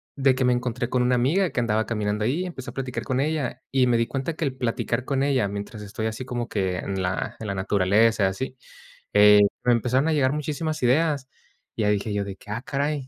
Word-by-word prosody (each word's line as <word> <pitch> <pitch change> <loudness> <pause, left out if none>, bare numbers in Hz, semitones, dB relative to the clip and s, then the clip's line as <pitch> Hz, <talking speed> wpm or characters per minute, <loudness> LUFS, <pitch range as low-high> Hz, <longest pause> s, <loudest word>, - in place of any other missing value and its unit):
de 135 -2 +3
que 130 - -1
me 125 0 +4
encontré 125 0 -2
con 125 -1 +1
una 125 0 +3
amiga 160 +10 +2
que - - -1
andaba 110 -1 +1
caminando 105 -1 -1
ahí, 155 +11 0
empecé 130 -9 -7
a - - -20
platicar 125 -3 -4
con 130 +4 -1
ella, 140 -4 -1
y 130 -2 +3
me 120 -1 +3
di 115 0 +1
cuenta 135 +4 -3
que 165 - -3
el 130 -2 -2
platicar 125 +1 -1
con 135 -1 0
ella, 135 -6 +2
mientras 100 +2 -6
estoy 110 +2 -4
así 110 +3 -5
como 120 -1 -4
que 95 -3 -1
en 95 0 -3
la 90 0 -2
en 110 - -6
la 100 - -2
naturaleza, 100 +2 +3
así, 130 +7 -4 0.6
eh, 105 0 +7 0.2
me 125 -1 +4
empezaron 125 +5 +1
a 160 - +2
llegar 135 -2 +2
muchísimas 150 +1 -3
ideas. 140 +1 +2 0.5
Y 115 - -2
ya 105 - +2
dije 105 +1 0
yo 100 0 0
de 100 -1 -7
que: - - -17
"Ah, 115 - -3
caray, 140 -1 -2
125 Hz, 235 wpm, -24 LUFS, 105-135 Hz, 0.6 s, eh